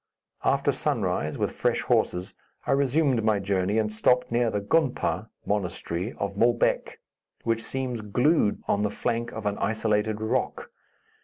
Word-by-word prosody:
After -, -, +2 dB
sunrise, 75 Hz, 0 st, -1 dB
with -, -, 0 dB
fresh -, -, 0 dB
horses, 90 Hz, +1 st, 0 dB, 0.3 s
I -, -, 0 dB
resumed 135 Hz, -2 st, +2 dB
my 110 Hz, -1 st, +3 dB
journey 100 Hz, +1 st, 0 dB
and 110 Hz, -1 st, 0 dB
stopped 125 Hz, +3 st, +2 dB
near 120 Hz, 0 st, +2 dB
the 105 Hz, -, -1 dB
gonpa 130 Hz, +6 st, 0 dB, 0.2 s
(monastery) 95 Hz, 0 st, -2 dB
of 100 Hz, 0 st, -3 dB
Moulbek, 120 Hz, +2 st, +1 dB, 0.5 s
which 115 Hz, 0 st, 0 dB
seems 125 Hz, -2 st, -3 dB
glued 125 Hz, +3 st, +2 dB
on 100 Hz, -, +1 dB
the 105 Hz, -, +1 dB
flank 115 Hz, +2 st, -2 dB
of 110 Hz, -, -7 dB
an 105 Hz, 0 st, -1 dB
isolated 110 Hz, -1 st, 0 dB
rock. 110 Hz, 0 st, -2 dB
110 Hz, 145 wpm, -26 LUFS, 100-120 Hz, 0.5 s, my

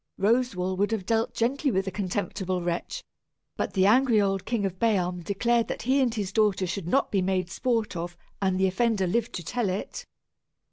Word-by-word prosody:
Roswal 195 Hz, -4 st, +1 dB
would 205 Hz, +3 st, +1 dB
have 205 Hz, -4 st, -2 dB
dealt 225 Hz, +2 st, 0 dB
gently 275 Hz, +5 st, +1 dB
with 190 Hz, -4 st, 0 dB
the 190 Hz, -, -3 dB
contemptible 185 Hz, -1 st, -2 dB
wretch, 175 Hz, -, -3 dB, 0.5 s
but -, -, -2 dB
the 190 Hz, -2 st, +3 dB
angry 235 Hz, +1 st, +5 dB
old 195 Hz, -2 st, 0 dB
King 230 Hz, -4 st, -1 dB
of 185 Hz, -1 st, -4 dB
Bealm 180 Hz, -6 st, +1 dB
declared 230 Hz, +5 st, +1 dB
that -, -, -4 dB
he 265 Hz, +4 st, +3 dB
and 250 Hz, -3 st, +2 dB
his 200 Hz, -3 st, -3 dB
daughter 210 Hz, -4 st, +2 dB
should 180 Hz, -1 st, -4 dB
not 275 Hz, +9 st, +1 dB
be 195 Hz, -, +2 dB
made 185 Hz, -1 st, -1 dB
sport 225 Hz, -2 st, -1 dB
of, 175 Hz, +1 st, -5 dB, 0.2 s
and 190 Hz, -1 st, +1 dB
the 190 Hz, -, +4 dB
offender 195 Hz, +1 st, +1 dB
live 230 Hz, +6 st, 0 dB
to 175 Hz, -, -5 dB
tell 230 Hz, +4 st, -1 dB
it. 185 Hz, +3 st, -5 dB
200 Hz, 195 wpm, -27 LUFS, 185-230 Hz, 0.5 s, angry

